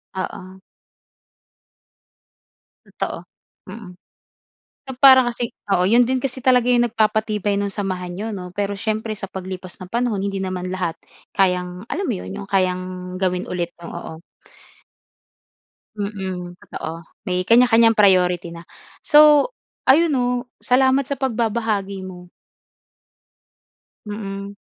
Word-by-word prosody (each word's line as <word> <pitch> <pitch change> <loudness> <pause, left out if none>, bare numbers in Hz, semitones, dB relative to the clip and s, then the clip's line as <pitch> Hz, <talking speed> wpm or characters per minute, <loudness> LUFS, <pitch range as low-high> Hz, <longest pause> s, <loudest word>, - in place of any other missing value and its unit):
Oo. 185 0 -6 2.3
Totoo, - - -5 0.5
mm. 200 -1 -9 1.0
Na - - -2
para 260 -1 +8
kasi 240 -1 -3 0.2
oo, 180 -1 +3
'yon 235 +5 +5
din 260 - +2
kasi 260 0 -4
talaga 250 -1 +4
yung 240 -1 +3
nagpapatibay 215 -2 0
ng 200 0 -1
samahan 185 -3 -3
n'yo, 215 - -4
'no? 180 -2 -6
Pero 200 +2 -2
siyempre 220 +2 -2
sa 195 -2 -7
paglipas 185 -1 -7
ng 185 - -8
panahon 235 -4 0
hindi 195 -1 -3
naman 185 -1 -3
lahat 180 -3 -2 0.4
kayang 180 0 0
alam 390 +2 -3
mo - - +1
'yon, 190 - -7
'yong 200 0 -8
kayang 185 -2 +1 0.4
gawin 180 -1 0
ulit, 175 -1 -2
o 170 - -10
o 170 - -6 0.2
o. - - -17 1.8
Mm, 190 -3 -4
totoo 165 +1 -7 0.2
may 180 0 0
kanya-kanyang 230 -1 +5
priority 180 -4 +3
na. 170 0 -11 0.4
So 300 - +6 0.4
ayun, 315 +3 +5
no, 250 -2 +1 0.4
salamat 260 +1 +3
sa 280 - -2
pagbabahagi 220 -6 -1
mo. 180 -1 -10 1.8
Mm. 200 -1 -6
200 Hz, 125 wpm, -21 LUFS, 185-235 Hz, 2.3 s, para